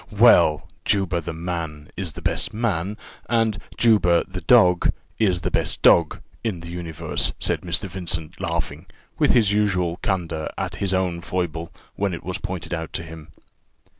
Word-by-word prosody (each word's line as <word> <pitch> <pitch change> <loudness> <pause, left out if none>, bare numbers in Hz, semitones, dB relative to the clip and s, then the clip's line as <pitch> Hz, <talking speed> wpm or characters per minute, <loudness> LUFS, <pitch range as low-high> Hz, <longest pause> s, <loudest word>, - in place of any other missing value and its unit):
"Well! 75 -1 +6 0.2
Juba, 95 -4 +1
the 85 - -5
man, 80 -3 -5
is 90 -4 -2
the - - -10
best - - 0
man 105 -3 -1 0.3
and 115 -4 +1 0.2
Juba, 100 -7 +4
the 90 -1 -6
dog, 90 -2 +5 0.3
is 95 -5 +2
the - - -2
best - - 0
dog, 85 -2 +5 0.2
in 100 -7 -2
the 85 0 -8
universe," 85 -2 -1
said - - -1
Mr. 90 +3 -1
Vincent, 85 -2 -4
laughing, 85 -2 -3 0.3
with - - +4
his 105 -4 +4
usual 90 -5 +1
candour, 85 -6 -2
at - - -3
his 100 -2 -1
own 90 -2 0
foible, 85 -2 -3 0.3
when 100 -3 0
it - - -10
was 90 +3 -4
pointed 90 -4 -5
out 80 -1 -4
to 85 - -3
him. 80 -1 -10
90 Hz, 165 wpm, -23 LUFS, 85-95 Hz, 0.3 s, Well